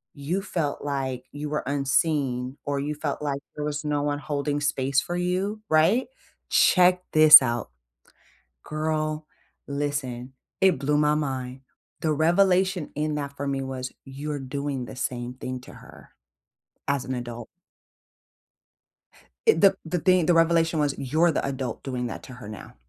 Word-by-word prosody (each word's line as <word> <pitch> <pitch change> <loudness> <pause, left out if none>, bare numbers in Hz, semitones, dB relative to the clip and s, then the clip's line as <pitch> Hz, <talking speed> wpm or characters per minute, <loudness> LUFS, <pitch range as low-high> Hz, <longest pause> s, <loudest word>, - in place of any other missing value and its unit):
"You 155 +7 -2
felt 165 -7 -3
like 135 -3 -3
you 145 0 -5
were 150 - -2
unseen 135 -2 0
or 140 -1 -1
you 150 +2 -3
felt 150 -1 -3
like 140 -2 -2
there 150 - -3
was 150 +1 -3
no 145 -1 0
one 145 0 0
holding 145 0 -2
space 140 -1 +1
for 175 - -4
you, 185 +4 -1
right?" 165 +11 +3 0.4
Check 180 0 +4
this 155 -1 +10
out. 120 - -2 1.0
Girl, 155 0 -2 0.4
listen. 140 -3 -3 0.3
It 190 -7 +4
blew 145 +2 +1
my 150 0 +3
mind. 130 -3 -3 0.4
The 155 -1 +1
revelation 180 +2 +2
in 150 0 -1
that 140 -1 -5
for 140 - -4
me 135 -1 -1
was, 130 -1 -5
"You're 145 +2 -5
doing 135 -1 -4
the - - -10
same 125 -1 -3
thing 130 0 -6
to - - -13
her - - -15 0.8
as 140 -2 0
an 130 - -3
adult." 120 -1 -6 2.0
Eh, 450 - +7
the 195 -1 +5
the 170 +2 -2
thing 180 0 +3
the 175 - +4
revelation 165 0 +3
was, 145 -2 0
"You're 155 +6 +2
the 155 - -1
adult 130 -3 -4
doing 125 -2 -3
that 120 - -6
to 130 - -10
her 125 -4 -10
now. 105 -2 -10
145 Hz, 155 wpm, -25 LUFS, 135-160 Hz, 2.0 s, this